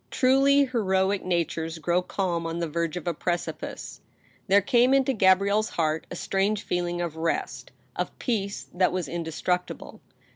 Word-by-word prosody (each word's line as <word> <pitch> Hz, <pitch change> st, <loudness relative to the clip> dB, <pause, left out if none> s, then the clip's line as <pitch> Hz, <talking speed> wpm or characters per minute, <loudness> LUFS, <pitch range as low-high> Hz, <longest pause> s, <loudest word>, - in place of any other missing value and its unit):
Truly 275 Hz, +2 st, +4 dB
heroic 195 Hz, -5 st, 0 dB
natures 165 Hz, -2 st, -2 dB
grow 170 Hz, +3 st, +1 dB
calm 175 Hz, -3 st, -2 dB
on 165 Hz, 0 st, -4 dB
the 170 Hz, -1 st, -1 dB
verge 170 Hz, +1 st, -2 dB
of 175 Hz, -, -6 dB
a 175 Hz, -, 0 dB
precipice. 175 Hz, +2 st, -4 dB, 0.5 s
There 200 Hz, +1 st, +6 dB
came 245 Hz, +6 st, +3 dB
into 270 Hz, 0 st, +2 dB
Gabrielle's 200 Hz, +1 st, +3 dB
heart 155 Hz, -1 st, -1 dB
a -, -, -6 dB
strange 195 Hz, +4 st, 0 dB
feeling 175 Hz, 0 st, -2 dB
of 165 Hz, -2 st, -4 dB
rest; 165 Hz, +1 st, -2 dB, 0.3 s
of -, -, -4 dB
peace 205 Hz, -5 st, -2 dB
that 180 Hz, +1 st, +2 dB
was 180 Hz, -1 st, -2 dB
indestructible. 170 Hz, +2 st, -3 dB
180 Hz, 150 wpm, -26 LUFS, 170-205 Hz, 0.5 s, There